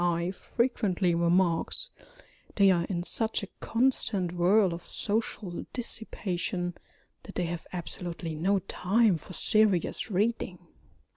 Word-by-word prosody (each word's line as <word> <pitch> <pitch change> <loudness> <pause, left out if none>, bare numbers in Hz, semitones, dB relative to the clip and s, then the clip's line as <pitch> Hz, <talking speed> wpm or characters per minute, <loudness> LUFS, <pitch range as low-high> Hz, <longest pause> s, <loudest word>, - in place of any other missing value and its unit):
I. 170 0 +1
frequently 200 -4 0
remarks, 170 - +2 0.6
they 200 -2 +6
are 170 -2 +2
in 175 -3 -2
such 220 +3 -1
a - - -4
constant 225 -7 +1
whirl 180 +2 +4
of 170 +1 -7
social 205 -4 -3
dissipation 185 -6 -1 0.5
that - - -11
they 180 - 0
have 170 -1 -5
absolutely 170 -2 -5
no 185 +6 +2
time 195 +2 +2
for 160 - -12
serious 210 +1 +2
reading. 205 -2 0
185 Hz, 120 wpm, -29 LUFS, 175-215 Hz, 0.6 s, they